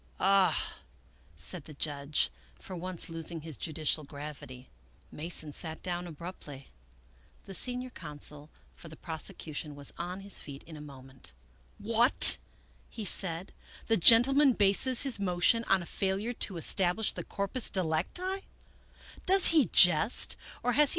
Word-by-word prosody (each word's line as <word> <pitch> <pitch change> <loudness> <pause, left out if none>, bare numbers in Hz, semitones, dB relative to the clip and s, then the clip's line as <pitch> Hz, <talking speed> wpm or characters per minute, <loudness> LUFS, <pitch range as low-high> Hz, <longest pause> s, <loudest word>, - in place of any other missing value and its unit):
" - - -33
Ah! 195 -1 +1 0.3
" - - -33
said 140 - -4
the 155 - -13
judge, 145 0 -2 0.3
for 185 - -10
once 180 0 -4
losing 165 0 -7
his 160 -1 -8
judicial 155 +1 -3
gravity. 140 -3 -11 0.4
Mason 155 -1 -5
sat 160 +1 -7
down 175 -1 -4
abruptly. 155 -4 -11 0.8
The 195 - -10
senior 250 +5 -3
counsel 150 - -6 0.2
for - - -15
the 160 - -11
prosecution 155 -2 -8
was 145 0 -4
on 180 +3 -6
his 200 -1 -3
feet 140 -1 -10
in 160 - -13
a 150 - -11
moment. 135 - -9 0.3
" 60 +1 -34
What! 230 +4 +7 0.2
" - - -33
he 220 - -8
said, 175 -1 -1 0.2
" - - -21
the 225 - +3
gentleman 255 - +7
bases 215 +6 +4
his 265 -7 0
motion 190 +4 +1
on 195 -2 +1
a - - -10
failure 195 +6 -3
to 195 -5 -3
establish 185 +5 +1
the - - -7
corpus 200 +4 -3
delicti? 190 - -2
175 Hz, 135 wpm, -29 LUFS, 150-200 Hz, 0.8 s, What